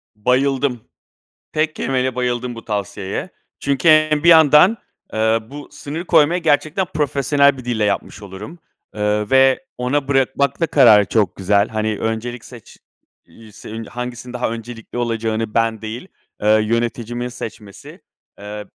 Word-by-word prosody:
Bayıldım! 125 Hz, +2 st, 0 dB, 0.7 s
Tek 155 Hz, 0 st, 0 dB
kelimeyle 130 Hz, -1 st, -1 dB
bayıldım 125 Hz, -1 st, -2 dB
bu 115 Hz, -, -11 dB
tavsiyeye. 100 Hz, -2 st, -4 dB, 0.3 s
Çünkü 140 Hz, +3 st, +1 dB
hem 155 Hz, -1 st, +4 dB
bir 170 Hz, -, +6 dB
yandan, 160 Hz, +6 st, +6 dB, 0.4 s
eee, 110 Hz, +1 st, +2 dB
bu 145 Hz, +1 st, -9 dB
sınır 160 Hz, +5 st, -7 dB
koymayı 170 Hz, +4 st, +3 dB
gerçekten 155 Hz, +6 st, +1 dB
profesyonel 140 Hz, -2 st, +1 dB
bir 130 Hz, -, -10 dB
dille 115 Hz, -3 st, -1 dB
yapmış 100 Hz, 0 st, -2 dB
olurum. 105 Hz, -, -10 dB, 0.4 s
Iıı, 105 Hz, 0 st, -1 dB
ve 135 Hz, -, +4 dB
ona 135 Hz, +3 st, -1 dB
bırakmak 135 Hz, 0 st, +1 dB
da 165 Hz, -, +1 dB
kararı 110 Hz, -7 st, +6 dB
çok 100 Hz, -5 st, 0 dB
güzel. 100 Hz, +2 st, +1 dB
Hani, 110 Hz, -1 st, -2 dB
öncelik 115 Hz, +2 st, -4 dB
seç 120 Hz, -4 st, -14 dB, 0.5 s
iii, 110 Hz, -1 st, -17 dB
senin, 110 Hz, +2 st, -8 dB
hangisinin 125 Hz, +1 st, -7 dB
daha 125 Hz, -2 st, -2 dB
öncelikli 115 Hz, +1 st, -8 dB
olacağını 115 Hz, -2 st, -2 dB
ben 115 Hz, -1 st, 0 dB
değil, 110 Hz, +10 st, -7 dB, 0.3 s
eee, 105 Hz, -, -1 dB, 0.2 s
yöneticimin 120 Hz, +1 st, -2 dB
seçmesi, 110 Hz, -4 st, -10 dB, 0.4 s
eee, 105 Hz, +1 st, -7 dB
120 Hz, 135 wpm, -19 LUFS, 110-140 Hz, 0.7 s, bir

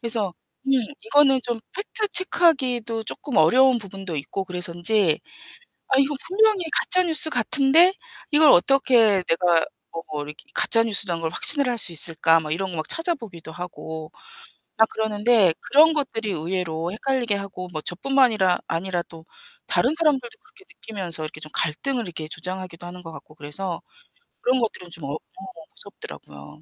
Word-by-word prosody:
그래서 220 Hz, -6 st, -1 dB, 0.3 s
음, -, -, 0 dB, 0.4 s
이거는 280 Hz, -6 st, +4 dB
좀 240 Hz, -2 st, -2 dB, 0.2 s
팩트 425 Hz, +2 st, -2 dB
체크하기도 265 Hz, -, +1 dB
쪼끔 265 Hz, +3 st, -4 dB
어려운 250 Hz, +10 st, +5 dB
부분도 195 Hz, -4 st, -7 dB
있고 190 Hz, +7 st, -4 dB
그래서인지 180 Hz, 0 st, 0 dB, 0.7 s
'아 265 Hz, -, +3 dB
이거 275 Hz, +2 st, +2 dB
분명히 425 Hz, 0 st, +3 dB
가짜 370 Hz, -1 st, +4 dB
뉴스 315 Hz, -1 st, +5 dB
같은데 285 Hz, -, +4 dB, 0.4 s
이걸 300 Hz, -1 st, +6 dB
어떻게 225 Hz, -2 st, +4 dB
내가 170 Hz, 0 st, +2 dB, 0.3 s
뭐 155 Hz, -3 st, -6 dB
이렇게 150 Hz, +1 st, -11 dB
가짜 230 Hz, -, +3 dB
뉴스라는 200 Hz, -6 st, -1 dB
걸 160 Hz, -, -1 dB
확신을 280 Hz, -, +2 dB
할 240 Hz, -, -2 dB
수 175 Hz, -, +4 dB
있을까?' 165 Hz, 0 st, +3 dB
막 155 Hz, -1 st, -5 dB
이런 190 Hz, +4 st, -2 dB
거 170 Hz, -, -6 dB
막 155 Hz, -, -3 dB
찾아보기도 230 Hz, -, -3 dB
하고 160 Hz, -2 st, -8 dB, 0.7 s
막 220 Hz, 0 st, +5 dB
그러는데 215 Hz, -3 st, +2 dB
그런 315 Hz, +3 st, +5 dB
것들이 235 Hz, -8 st, -3 dB
의외로 170 Hz, -1 st, -3 dB
헷갈리게 240 Hz, 0 st, -1 dB
하고 195 Hz, -2 st, -6 dB
뭐 155 Hz, -2 st, -4 dB
저뿐만이라 215 Hz, -, +2 dB
아니라 175 Hz, +1 st, -2 dB
또 165 Hz, -1 st, -15 dB, 0.4 s
다른 255 Hz, -, +1 dB
사람들도 290 Hz, -7 st, 0 dB
그렇게 435 Hz, -2 st, -22 dB
느끼면서 185 Hz, -7 st, -3 dB
이렇게 155 Hz, 0 st, -7 dB
좀 155 Hz, -, -8 dB
갈등을 240 Hz, -, -1 dB
이렇게 160 Hz, -3 st, -7 dB
조장하기도 180 Hz, +1 st, -6 dB
하는 180 Hz, +1 st, -10 dB
것 165 Hz, -, -10 dB
같고 155 Hz, -, -13 dB
그래서 160 Hz, +4 st, -5 dB, 0.6 s
그런 255 Hz, +1 st, +2 dB
것들은 200 Hz, -6 st, -3 dB
좀 170 Hz, -3 st, -6 dB
어, 140 Hz, +3 st, -4 dB, 0.6 s
무섭더라고요. 75 Hz, -, -11 dB
200 Hz, 360 characters per minute, -23 LUFS, 170-265 Hz, 0.7 s, 이걸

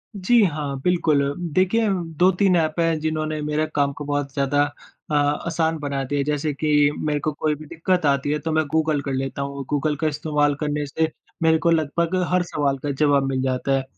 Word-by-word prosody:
जी, 210 Hz, +4 st, +4 dB
हाँ। 145 Hz, -5 st, -1 dB
बिल्कुल 170 Hz, -5 st, +2 dB, 0.3 s
देखिए, 200 Hz, +6 st, +2 dB
2-3 180 Hz, +1 st, +2 dB
एप 155 Hz, 0 st, 0 dB
हैं, 165 Hz, -2 st, +2 dB
जिन्होंने 155 Hz, 0 st, -2 dB
मेरे 150 Hz, +1 st, 0 dB
काम 140 Hz, -1 st, +2 dB
को 150 Hz, -, -7 dB
बहुत 145 Hz, -1 st, -2 dB
ज़्यादा 140 Hz, +1 st, +2 dB, 0.5 s
अ, -, -, -1 dB
आसान 160 Hz, +3 st, 0 dB
बना 140 Hz, -2 st, -2 dB
दिया 145 Hz, +2 st, -2 dB
है। -, -, +2 dB
जैसे 150 Hz, +1 st, -1 dB
कि 150 Hz, 0 st, +3 dB, 0.2 s
मेरे 150 Hz, -1 st, 0 dB
को 155 Hz, +2 st, -1 dB
कोई 150 Hz, +1 st, -1 dB
भी 155 Hz, -, -11 dB
दिक्कत 170 Hz, +1 st, 0 dB
आती 140 Hz, 0 st, +1 dB
है, 150 Hz, -, 0 dB
तो 160 Hz, +2 st, -3 dB
मैं 155 Hz, 0 st, +2 dB
गूगल 155 Hz, -2 st, +1 dB
कर 140 Hz, -1 st, -4 dB
लेता 135 Hz, +1 st, -3 dB
हूँ। 140 Hz, 0 st, -4 dB
गूगल 150 Hz, +1 st, 0 dB
का 160 Hz, -, +2 dB
इस्तेमाल 150 Hz, -1 st, 0 dB
करने 150 Hz, 0 st, -2 dB
से 160 Hz, +3 st, -1 dB, 0.3 s
मेरे 160 Hz, 0 st, +5 dB
को 170 Hz, -, +1 dB
लगभग 165 Hz, +2 st, 0 dB, 0.2 s
हर 180 Hz, 0 st, +3 dB
सवाल 145 Hz, -5 st, -1 dB
का 145 Hz, -, -1 dB
जवाब 140 Hz, 0 st, +2 dB
मिल 130 Hz, -1 st, -1 dB
जाता 130 Hz, +1 st, -1 dB
है। 135 Hz, -, -2 dB
150 Hz, 205 wpm, -22 LUFS, 145-160 Hz, 0.5 s, मेरे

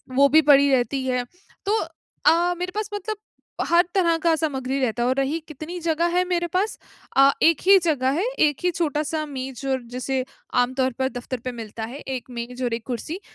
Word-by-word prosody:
वो 280 Hz, +1 st, +6 dB
भी 315 Hz, +3 st, +6 dB
पड़ी 280 Hz, 0 st, +6 dB
रहती 260 Hz, +1 st, +1 dB
है। 250 Hz, -1 st, 0 dB, 0.4 s
तो 430 Hz, +2 st, +2 dB, 0.5 s
अ, 345 Hz, +2 st, +4 dB
मेरे 360 Hz, +1 st, -3 dB
पास 425 Hz, 0 st, -2 dB
मतलब 415 Hz, +1 st, -4 dB, 0.5 s
हर 340 Hz, +1 st, +5 dB
तरह 335 Hz, -3 st, +3 dB
का 330 Hz, -1 st, +4 dB
सामग्री 275 Hz, -4 st, -2 dB
रहता 240 Hz, -2 st, 0 dB
है 245 Hz, -, +2 dB
और 260 Hz, -, +2 dB
रही, 275 Hz, +4 st, 0 dB
कितनी 315 Hz, +4 st, -7 dB
जगह 335 Hz, +1 st, +1 dB
है 365 Hz, -, +4 dB
मेरे 350 Hz, -1 st, 0 dB
पास 395 Hz, +4 st, 0 dB, 0.4 s
अ, 275 Hz, +1 st, +7 dB
एक 330 Hz, -2 st, +5 dB
ही 395 Hz, 0 st, +9 dB
जगह 275 Hz, -6 st, +1 dB
है, -, -, +1 dB, 0.2 s
एक 295 Hz, -3 st, +3 dB
ही 360 Hz, -, +3 dB
छोटा-सा 310 Hz, -1 st, -1 dB
मेज़ 265 Hz, -2 st, -6 dB
और 260 Hz, -1 st, 0 dB
जैसे 255 Hz, +1 st, -1 dB, 0.4 s
आमतौर 260 Hz, +1 st, 0 dB
पर 265 Hz, 0 st, +1 dB
दफ़्तर 245 Hz, +1 st, -5 dB
पे 255 Hz, -, -1 dB
मिलता 225 Hz, -1 st, -7 dB
है, 280 Hz, -, -8 dB
एक 260 Hz, -3 st, -6 dB
मेज़ 245 Hz, +2 st, -5 dB
और 235 Hz, -, -1 dB
एक 230 Hz, -1 st, -4 dB
कुर्सी, 280 Hz, -, -4 dB
280 Hz, 200 wpm, -23 LUFS, 255-335 Hz, 0.5 s, ही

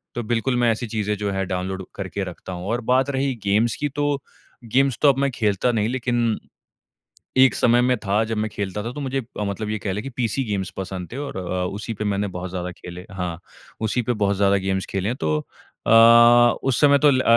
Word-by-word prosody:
तो 120 Hz, -, -2 dB
बिल्कुल 120 Hz, +3 st, 0 dB
मैं 120 Hz, -1 st, +3 dB
ऐसी 115 Hz, +2 st, -3 dB
चीज़ें 105 Hz, -1 st, -1 dB
जो 105 Hz, 0 st, -2 dB
है 95 Hz, 0 st, -1 dB
डाउनलोड 95 Hz, +1 st, -3 dB
करके 100 Hz, 0 st, -4 dB
रखता 90 Hz, +1 st, -7 dB
हूँ 90 Hz, 0 st, -6 dB
और 120 Hz, +1 st, -1 dB
बात 130 Hz, +2 st, +3 dB
रही 135 Hz, -1 st, 0 dB
गेम्स 105 Hz, +4 st, +2 dB
की। 145 Hz, -, 0 dB
तो 145 Hz, 0 st, -1 dB, 0.5 s
गेम्स 135 Hz, -1 st, +3 dB
तो 145 Hz, -, +6 dB
अब 135 Hz, -, +2 dB
मैं 140 Hz, 0 st, +2 dB
खेलता 110 Hz, +1 st, +1 dB
नहीं 110 Hz, -2 st, 0 dB
लेकिन 120 Hz, -3 st, 0 dB, 1.0 s
एक 130 Hz, 0 st, +6 dB
समय 120 Hz, +1 st, +4 dB
में 125 Hz, 0 st, +2 dB
था 105 Hz, +3 st, +2 dB
जब 110 Hz, 0 st, -3 dB
मैं 110 Hz, +1 st, 0 dB
खेलता 100 Hz, 0 st, -4 dB
था। 120 Hz, -, -4 dB
तो 145 Hz, -, -7 dB
मुझे 135 Hz, -1 st, -2 dB, 0.2 s
मतलब 105 Hz, +1 st, -3 dB
ये 110 Hz, -, -1 dB
कह 95 Hz, -1 st, -3 dB
ले 105 Hz, -, -3 dB
कि 135 Hz, -, -6 dB
पीसी 125 Hz, +2 st, -1 dB
गेम्स 100 Hz, -4 st, -2 dB
पसंद 95 Hz, 0 st, -5 dB
थे -, -, -5 dB
और 145 Hz, -7 st, -5 dB
अ, 90 Hz, 0 st, -2 dB
उसी 105 Hz, +3 st, -5 dB
पे 105 Hz, -, -4 dB
मैंने 100 Hz, 0 st, 0 dB
बहुत 90 Hz, 0 st, -5 dB
ज़्यादा 90 Hz, 0 st, -4 dB
खेले 90 Hz, +2 st, -10 dB
हाँ, 90 Hz, -3 st, -4 dB, 0.4 s
उसी 110 Hz, +3 st, 0 dB
पे 120 Hz, +2 st, 0 dB
बहुत 100 Hz, -3 st, 0 dB
ज़्यादा 100 Hz, 0 st, +3 dB
गेम्स 95 Hz, 0 st, -1 dB
खेले 95 Hz, +1 st, -1 dB
हैं। 125 Hz, -, -2 dB
तो 75 Hz, -1 st, +1 dB, 0.5 s
अ, -, -, +3 dB, 0.7 s
उस 135 Hz, -2 st, +1 dB
समय 140 Hz, -1 st, +6 dB
तो 150 Hz, 0 st, +5 dB
ल 130 Hz, -1 st, +2 dB
110 Hz, 225 wpm, -22 LUFS, 95-125 Hz, 1.0 s, तो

